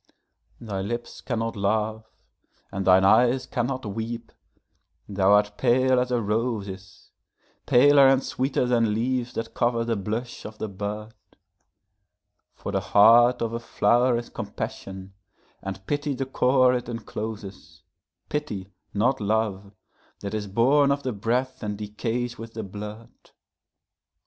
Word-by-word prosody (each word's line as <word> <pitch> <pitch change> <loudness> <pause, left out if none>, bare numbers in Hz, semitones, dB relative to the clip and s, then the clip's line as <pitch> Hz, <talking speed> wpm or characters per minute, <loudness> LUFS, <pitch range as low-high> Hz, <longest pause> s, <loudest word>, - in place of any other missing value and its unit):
Thy 100 -4 -4
lips 120 +4 -5
cannot 115 -2 -2
laugh 110 +2 -1 0.6
and 95 -1 -3
thine 95 +1 +6
eyes 125 +5 +4
cannot 130 0 -2
weep; 115 +3 -5 0.8
thou 100 -1 +2
art 105 0 +2
pale 130 +1 +3
as 125 0 0
a 125 -1 +1
rose 110 0 -1
is, 95 -1 -11 0.6
Paler 140 +2 +7
and 135 0 +4
sweeter 130 0 -1
than 115 -3 +2
leaves 120 +1 -1
that 115 0 -5
cover 120 -1 +1
the 115 -1 0
blush 110 +5 -4
of 110 0 -9
the 110 - -3
bud; 105 +2 -5 1.5
And - - -3
the - - +2
heart 120 +4 +5
of 115 - -2
the 115 - -3
flower 120 +1 +2
is 120 - -5
compassion, 95 0 -6 0.5
and 95 0 -7
pity 145 +2 -1
the 135 - -2
core 130 -1 +3
it 125 -1 -2
incloses, 105 -8 -7 0.4
Pity, 105 -11 -4 0.2
not 115 +4 +1
love, 105 -2 -1 0.5
that 100 - -5
is 105 -1 -3
born 135 +8 +3
of 140 0 -1
the 130 - -2
breath 125 +5 -1
and 105 -2 -3
decays 115 +4 -3
with 115 0 -9
the 110 - -4
blood. 105 +3 -8
115 Hz, 140 wpm, -25 LUFS, 105-125 Hz, 1.5 s, Paler